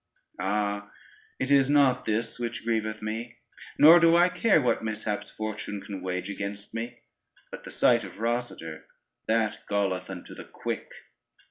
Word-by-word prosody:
Ah, 100 +1 -1 0.5
it 130 +1 -2
is 135 -1 +5
not 140 -3 +4
this 115 +2 -1
which 120 -1 -4
grieveth 110 -2 -1
me, 115 +2 -5 0.4
nor 160 +4 +9
do 165 0 +5
I 175 +1 +5
care 200 -1 +3
what 125 -4 +1
mishaps 110 -1 -3
Fortune 110 -1 -5
can 100 -1 -7
wage 90 0 -3
against 100 0 -5
me, 120 +2 -5 0.5
but - - -9
the - - -8
sight 120 -2 +3
of 95 - -10
Rosader 115 -9 -3 0.4
that 110 -1 +1
galleth 100 -3 0
unto 95 -2 -8
the - - -10
quick. - - -5
110 Hz, 150 wpm, -27 LUFS, 100-120 Hz, 0.5 s, nor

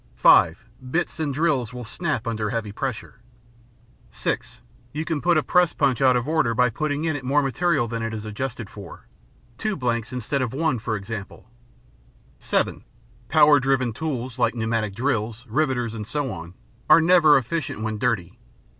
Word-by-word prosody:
(5) - - +5 0.2
Bits 170 +3 -1
and 155 -3 -1
drills 135 -5 0
will 125 - -6
snap 135 0 -3
under 110 -2 -2
heavy 115 -4 -3
pressure. 120 0 -5 0.9
(6) - - -3 0.3
You 155 +2 -3
can 155 -2 -2
put 175 -1 +3
a 155 - +2
press 180 -2 +3
punch 135 -4 +1
out 130 -2 +5
of 120 +2 -3
order 155 -8 +1
by 125 0 +3
putting 150 +4 -2
in 160 -2 0
it 140 - -5
more 140 +3 +2
material 140 -1 +1
than 115 0 -4
it 115 0 -2
is 110 -1 -6
adjusted 120 +1 -5
for—two 120 - -8
blanks 120 - -2
instead 125 +2 -2
of 125 0 -2
one, 155 -5 0
for 110 0 -2
example. 105 +1 -7 0.9
(7) - - -1 0.5
Power 150 -1 +6
driven 130 -3 +1
tools 130 -4 -4
like - - +2
pneumatic 110 -3 -1
drills, 115 -2 -2
riveters, 125 -2 0
and 105 -2 -6
so 145 -3 -2
on, 85 +1 -9 0.3
are - - +8
never 165 -2 +6
efficient 130 -3 -3
when 110 -1 -3
dirty. 105 -8 -1
125 Hz, 165 wpm, -24 LUFS, 115-150 Hz, 0.9 s, are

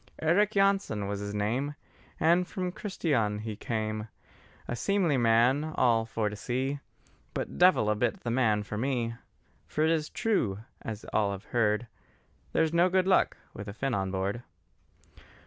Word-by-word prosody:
Eric 180 +7 +3
Jansen 195 - +2
was 100 0 -3
his 100 0 -4
name, 125 +8 -1 0.4
And 175 +3 +3
from 180 -2 -3
Christián' 140 - -1
he 110 -1 -5
came; 110 0 -3 0.6
A 120 - -2
seemly 185 0 +1
man 120 +4 +4
all 115 -3 +3
for 110 -1 -1
to 105 - -4
see, 130 +6 -2 0.6
But - - -4
devil 180 -11 +5
a 105 - +3
bit 110 +2 -1
the 120 - -2
man 110 -4 +2
for 105 +1 -5
me: 120 -2 -1 0.5
For 155 - 0
it 160 - +3
is 155 -2 0
true, 195 - 0 0.2
as 110 -1 -6
all 105 -2 +2
have 100 - -8
heard, 110 -1 +1 0.7
There's 160 0 +2
no 175 +2 +4
good 185 0 +2
luck 190 0 +3 0.2
with 100 +1 -8
a 100 - -5
Finn 135 +4 -2
on 95 -2 0
board. 95 +4 -2
120 Hz, 165 wpm, -29 LUFS, 105-160 Hz, 0.7 s, devil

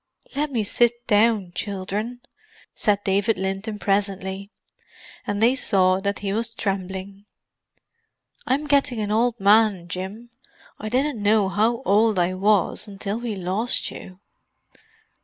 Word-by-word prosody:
"Let 295 +1 -1
me 230 -5 0
sit 240 +3 +1
down, 210 -4 +2
children," 205 +5 -4 0.5
said 205 -1 +2
David 200 +3 +1
Linton 195 +3 -3
presently; 195 -1 -1 0.8
and 205 +1 -1
they 240 +3 +5
saw 190 -7 +2
that 200 +1 -2
he 195 - 0
was 230 +1 -3
trembling. 195 0 -4 1.2
"I'm 280 +3 +1
getting 280 -5 +1
an 210 -1 -2
old 235 +2 +1
man, 200 -3 +4
Jim; 190 +7 -6 0.5
I 215 - -4
didn't 260 0 0
know 205 -1 +3
how 225 +5 +1
old 210 +1 +3
I 175 +1 +1
was, 205 +2 +1
until 200 +2 -4
we 235 -3 -4
lost 190 +6 -1
you." 185 0 -11
205 Hz, 130 wpm, -23 LUFS, 195-230 Hz, 1.2 s, they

